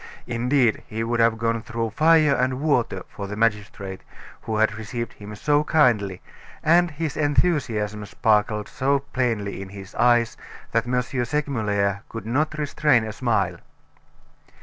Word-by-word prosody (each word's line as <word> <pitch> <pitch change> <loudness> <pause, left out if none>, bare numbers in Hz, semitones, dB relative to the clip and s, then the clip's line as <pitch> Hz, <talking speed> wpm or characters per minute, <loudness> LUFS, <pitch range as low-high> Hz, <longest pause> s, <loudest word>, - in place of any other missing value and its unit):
Indeed, 120 0 +1
he 110 +1 -3
would 120 +1 -1
have 115 -1 +3
gone 115 0 0
through 115 -1 -3
fire 155 +3 +4
and 130 0 0
water 125 -10 0
for 100 - -7
the 105 - -5
magistrate 105 -3 -1 0.4
who 110 - -3
had 110 -1 +3
received 110 +2 -5
him 105 +1 -10
so 145 +6 +2
kindly, 115 - +2 0.4
and 175 +2 +4
his 155 -1 -4
enthusiasm 135 -9 0
sparkled 105 0 +1
so 140 +2 +1
plainly 115 -8 -2
in 95 - -8
his 100 -1 -10
eyes 120 -1 +3 0.3
that 115 +1 +1
M. 125 0 +1
Segmuller 115 -7 -1
could 115 -3 -7
not 150 +7 0
restrain 145 -4 +2
a 110 -1 -5
smile. 100 -8 0
115 Hz, 145 wpm, -24 LUFS, 105-140 Hz, 0.4 s, fire